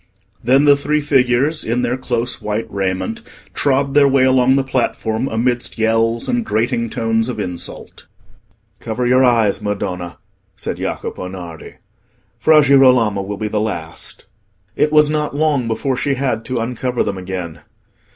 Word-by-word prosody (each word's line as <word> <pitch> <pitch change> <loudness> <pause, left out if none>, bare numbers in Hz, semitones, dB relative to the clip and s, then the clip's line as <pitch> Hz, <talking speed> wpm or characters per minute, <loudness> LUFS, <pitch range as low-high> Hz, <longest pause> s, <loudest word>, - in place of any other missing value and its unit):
Then 135 +5 +4
the 145 -1 +7
three 150 +2 0
figures, 140 +1 +1
in 120 +2 -1
their 125 0 0
close 125 -1 -3
white 105 +2 -2
raiment, 100 - -2 0.3
trod 140 0 +1
their 145 -1 +5
way 135 -1 +3
along 130 0 +4
the 135 - +2
platform, 120 -2 -1
amidst 120 +1 -1
yells 115 +1 +1
and 245 -1 0
grating 115 - -1
tones 115 +1 -1
of 115 -4 -4
insult. 90 -3 -7 0.7
"Cover 125 +2 -3
your 130 +2 +4
eyes, 115 -5 +2
Madonna," 90 -4 -4 0.4
said - - -5
Jacopo 90 - -4
Nardi; 90 -4 -9 0.6
"Fra 155 -1 +5
Girolamo 125 -7 +4
will 100 +1 -5
be 110 - -3
the 105 0 -1
last." 85 -7 -5 0.5
It 150 - +1
was 150 -1 +5
not 150 -1 -2
long 145 -5 +1
before 130 +4 -1
she 135 +2 -1
had 125 -4 -2
to 130 - -3
uncover 125 +1 -1
them 100 -2 -3
again. 90 -3 -6
120 Hz, 150 wpm, -18 LUFS, 110-135 Hz, 0.7 s, the